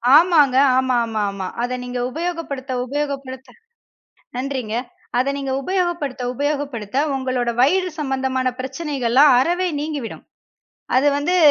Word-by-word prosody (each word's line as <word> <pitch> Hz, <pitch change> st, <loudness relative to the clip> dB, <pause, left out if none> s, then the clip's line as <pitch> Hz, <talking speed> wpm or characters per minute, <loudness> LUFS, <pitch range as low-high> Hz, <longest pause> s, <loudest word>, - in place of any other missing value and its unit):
ஆமாங்க, 305 Hz, -5 st, +5 dB, 0.2 s
ஆமாமாமா 220 Hz, -7 st, 0 dB, 0.2 s
அத 245 Hz, +1 st, -1 dB
நீங்க 250 Hz, 0 st, -4 dB
உபயோகப்படுத்த, 315 Hz, -5 st, -4 dB
உபயோகப்படுத்த 275 Hz, -, -5 dB, 0.8 s
நன்றிங்க. 255 Hz, -4 st, -3 dB, 0.4 s
அத 255 Hz, +2 st, +2 dB
நீங்க 275 Hz, -1 st, -3 dB
உபயோகப்படுத்த, 345 Hz, -8 st, -1 dB
உபயோகப்படுத்த 280 Hz, -6 st, -3 dB, 0.2 s
உங்களோட 255 Hz, -2 st, -1 dB
வயிறு 365 Hz, +6 st, +3 dB
சம்பந்தமான 265 Hz, -2 st, 0 dB
பிரச்சனைகள்லாம் 265 Hz, -1 st, +3 dB
அறவே 355 Hz, +6 st, +1 dB
நீங்கிவிடும். 295 Hz, -6 st, -5 dB, 0.7 s
அதுவந்து 290 Hz, +5 st, +2 dB
270 Hz, 95 wpm, -21 LUFS, 255-295 Hz, 0.8 s, ஆமாங்க